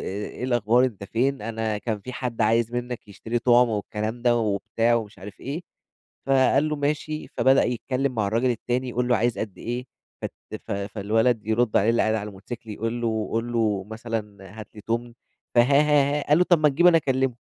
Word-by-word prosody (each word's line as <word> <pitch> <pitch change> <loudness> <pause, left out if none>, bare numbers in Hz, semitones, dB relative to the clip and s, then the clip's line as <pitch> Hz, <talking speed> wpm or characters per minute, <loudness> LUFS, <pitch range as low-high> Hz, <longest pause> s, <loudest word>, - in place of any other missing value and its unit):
إيه 105 +5 -5
الأخبار 120 0 +3
أنت 105 -6 -3
فين؟ 125 +4 -1
أنا 110 -1 -2
كان 110 -1 -3
في 125 +5 -8
حد 120 -1 -4
عايز 115 +2 +2
منّك 120 -2 -4
يشتري 115 +4 -3
طُعم،" 120 0 +4
والكلام 110 +2 -3
ده 120 -1 +3
وبتاع 115 +2 +1
مش 105 -2 -14
عارف 100 +3 -11
إيه. 145 +6 -5 0.6
فقال 135 +2 +3
له: 150 - -1
"ماشي." 150 +2 -2
فبدأ 130 +2 +3
يتكلّم 130 +2 -1
مع 110 -3 0
الراجل 115 +4 +1
التاني، 125 +2 -2
يقول 125 0 -1
له 120 - +4
عايز 120 +2 0
قد 105 -4 -5
إيه 120 +2 -4 0.4
فت - - -4 0.4
ف - - -2
فالولد 105 +3 0
يرُد 110 +1 +1
عليه 105 +3 +4
اللي 115 - +2
قاعد 110 0 +1
على 105 -1 -3
الموتوسيكل 110 +3 -9
يقول 115 +3 -3
له: 110 -2 -1
"قُل 115 +1 -1
له 105 -5 0
مثلًا 110 -3 -6
هات 105 - -9
لي 105 - -10
تُمن." 120 +2 -3 0.4
فها 120 - +8
ها، 140 +3 +4
ها، 145 -1 +3
ها. - - -8
قال 150 +2 +5
له: 180 - +4
"طب 175 -2 +4
ما 150 - +5
تجيب 155 +5 +3
أنا 175 -2 +7
أكلّمه، 130 -3 0
120 Hz, 205 wpm, -24 LUFS, 110-130 Hz, 0.6 s, فها